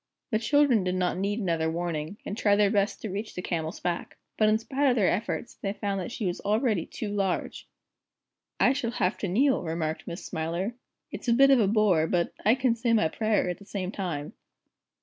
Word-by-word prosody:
The 215 - +2
children 265 -3 +3
did 180 0 -1
not 180 0 0
need 200 +2 -1
another 165 -6 0
warning, 165 +1 -3
and 200 - -4
tried 205 -2 +3
their 205 -1 +3
best 200 -1 0
to 220 - -3
reach 205 +3 -5
the 180 - -3
Camel's 160 -1 -3
back. 175 -1 -3 0.2
But 215 -1 +3
in 215 - +4
spite 270 +5 0
of 245 - +3
their 205 -6 +3
efforts, 215 +4 -2
they 195 -1 -4
found 200 -2 -2
that 180 - -5
she 230 - -4
was 175 -1 -2
already 210 -3 +1
too 215 - -5
large. 195 -3 -2 0.9
"I 260 - +5
shall 265 -4 -2
have 180 +3 0
to 200 - -2
kneel," 260 +9 +2
remarked 160 -2 -3
Miss 170 +3 -6
Smiler. 170 +7 -2 0.4
"It's - - -7
a 235 - +4
bit 275 +3 +6
of 270 - +6
a 210 - +3
bore, 195 -6 +3
but 175 0 0
I 220 +4 +5
can 255 -2 +2
say 230 0 0
my 190 -8 +3
prayer 215 -1 +1
at 180 - -3
the 200 - -14
same 195 -2 -4
time." 170 -8 -4
200 Hz, 215 wpm, -27 LUFS, 175-225 Hz, 0.9 s, bit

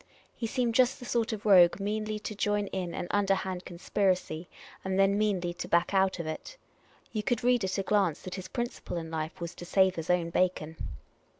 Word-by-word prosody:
He 230 - -3
seemed 245 -1 0
just 255 0 +4
the 245 - -10
sort 235 -2 0
of 215 -1 -5
rogue 185 -3 +7
meanly 215 +1 -2
to 215 - -4
join 205 0 0
in 180 -3 -3
an - - -3
underhand 190 -2 0
conspiracy, 180 -2 -1 0.3
and 190 0 -1
then 195 0 +4
meanly 195 -5 0
to 175 - -6
back 170 +3 +2
out 190 -1 +3
of 170 - -4
it. 155 - -6 0.5
You 215 - -1
could 240 +1 -1
read 245 -2 +3
at 190 +1 -1
a 195 - 0
glance 190 -6 +1
that 185 - -6
his 185 -1 -6
principle 240 -6 -4
in 165 -1 -5
life 160 +2 -4
was 170 -1 -5
to - - -10
sav^e 190 +1 +3
his 165 -3 -6
own 175 -2 +2
bacon. 165 -3 0
190 Hz, 205 wpm, -29 LUFS, 175-210 Hz, 0.5 s, rogue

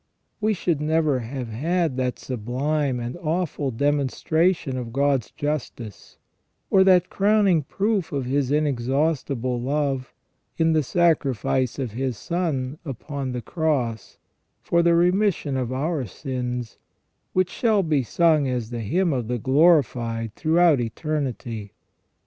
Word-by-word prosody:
We 215 0 +1
should 170 -4 -1
never 155 -3 +1
have 125 +1 -5
had 160 +5 0
that 125 -1 -1
sublime 130 +3 -2
and 120 +1 -4
awful 165 -4 -2
demonstration 145 +4 +1
of 120 -3 -5
God's 135 -2 +1
justice, 130 - -5 0.5
or 190 - +6
that 185 -2 +4
crowning 200 -4 +3
proof 195 +4 -1
of 140 -4 -2
His 135 0 0
inexhaustible 135 -3 0
love, 135 -1 -1 0.5
in 160 -1 +3
the 155 - +3
sacrifice 135 - +1
of 130 -5 -3
His 125 0 -3
Son 150 - -2
upon 140 -1 -5
the 125 -1 -4
Cross, 140 -9 -2 0.5
for 170 - +2
the 170 0 +4
remission 180 -4 +2
of 130 -2 -2
our 140 0 -1
sins, 125 - -5 0.5
which 185 0 +1
shall 220 -4 +2
be 155 -4 +1
sung 155 +2 +2
as 125 -3 -3
the 120 - -4
hymn 170 - +1
of 125 -4 -2
the 125 +1 -1
glorified 120 -5 +2
throughout 160 0 +3
eternity. 120 -5 -4
140 Hz, 130 wpm, -24 LUFS, 125-165 Hz, 0.5 s, or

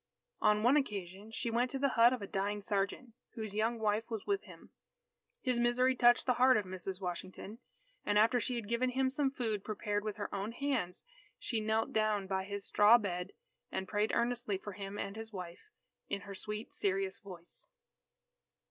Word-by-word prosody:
On 210 0 +4
one 255 +5 +6
occasion, 200 -6 -3
she 230 +1 -3
went 240 +2 +2
to 270 - -3
the 275 +1 +2
hut 235 -1 +6
of 250 -5 -2
a - - -2
dying 200 +1 -2
sergeant, 205 +5 -1 0.2
whose 220 -4 -5
young 225 +3 +1
wife 220 +1 0
was 225 -3 -4
with 400 -1 0
him. - - -14 0.7
His 250 -2 +1
misery 250 +2 +3
touched 240 -1 +5
the 250 - +3
heart 255 -1 +7
of 210 - -1
Mrs. 185 0 -5
Washington, 185 +4 -6 0.4
and 205 0 +1
after 230 +4 +5
she 250 +1 -1
had 230 -3 -4
given 235 +3 +1
him 260 +1 +1
some 275 0 +2
food 225 -7 -2
prepared 205 -1 -2
with 215 -2 -3
her 205 -2 -5
own 200 +3 -3
hands, 255 - -2 0.3
she 225 -3 -2
knelt 220 +1 0
down 215 -2 +1
by 190 0 -2
his 200 0 -5
straw 210 +3 +7
bed, 180 -5 -4 0.4
and 190 - -3
prayed 210 0 +1
earnestly 235 -4 0
for 205 +2 -7
him 195 +1 -6
and 200 0 -4
his 225 0 -7
wife, 180 - -8 0.4
in 200 - -2
her 200 0 -8
sweet 210 +3 -5
serious 195 -1 -1
voice. 180 -4 -11
215 Hz, 190 wpm, -34 LUFS, 200-240 Hz, 0.7 s, heart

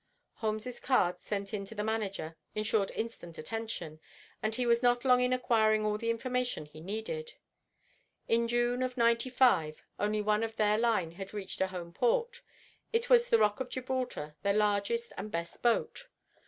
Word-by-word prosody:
Holmes's 220 +2 -3
card 190 -9 +2
sent 200 -1 -4
in 200 -2 -2
to 225 - -10
the 210 - -2
manager 205 -7 -2 0.2
ensured 215 -2 +1
instant 220 -7 -5
attention, 175 -4 -5 0.4
and 215 0 -1
he 250 +1 0
was 235 0 +3
not 245 0 +3
long 250 -1 +5
in 250 0 +2
acquiring 220 -4 +3
all 210 0 0
the 230 - -2
information 250 -2 -1
which 150 - -17
he 155 - -11
needed. 220 - -4 0.9
In 230 0 +3
June 240 +1 +1
of 255 0 -2
'95 235 -8 +3 0.2
only 210 +1 +1
one 210 +1 +2
of 225 0 -3
their 210 -1 +3
line 220 -8 +1
had 195 +4 -8
reached 195 -2 -5
a 190 - +3
home 175 -2 -7
port. 480 - +1 0.5
It 465 +1 0
was 485 0 +6
the 465 - +6
ROCK 210 - +2
OF 260 -1 -3
GIBRALTAR, 250 - -3
their 200 0 +1
largest 210 +3 +1
and 215 - -5
best 170 -3 -5
boat. 240 - +1
225 Hz, 175 wpm, -31 LUFS, 200-250 Hz, 0.9 s, was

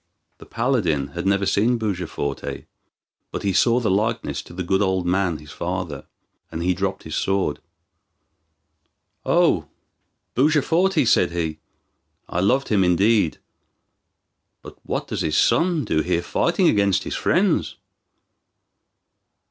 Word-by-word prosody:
The - - -14
paladin 85 - 0
had 85 +6 -4
never 100 0 +2
seen 115 +6 +2
Bujaforte, 90 -9 -4 0.7
but - - -5
he 100 -1 0
saw 120 +5 +3
the 110 -5 0
likeness 110 +4 -1
to - - -15
the 90 - -3
good 95 +3 +1
old 95 -2 0
man, 90 -2 +1
his 75 0 -13
father, 85 -1 -4 0.4
and 80 - -4
he 90 +1 +2
dropped 95 +1 -3
his 80 - -8
sword. 95 +3 0 1.7
"O - - +3 0.7
Bujaforte," 155 +4 +2
said 85 - +3
he, 80 -3 -3 0.7
"I 90 - -2
loved 125 +9 +1
him 100 -3 +3
indeed; 95 0 +2 1.3
but - - -11
what - - -4
does - - -3
his 75 -1 0
son 165 -5 +2
do 80 -6 +1
here 85 +1 -1
fighting - - +1
against 100 -2 +2
his - - -5
friends?" - - +1
95 Hz, 130 wpm, -22 LUFS, 85-115 Hz, 1.7 s, saw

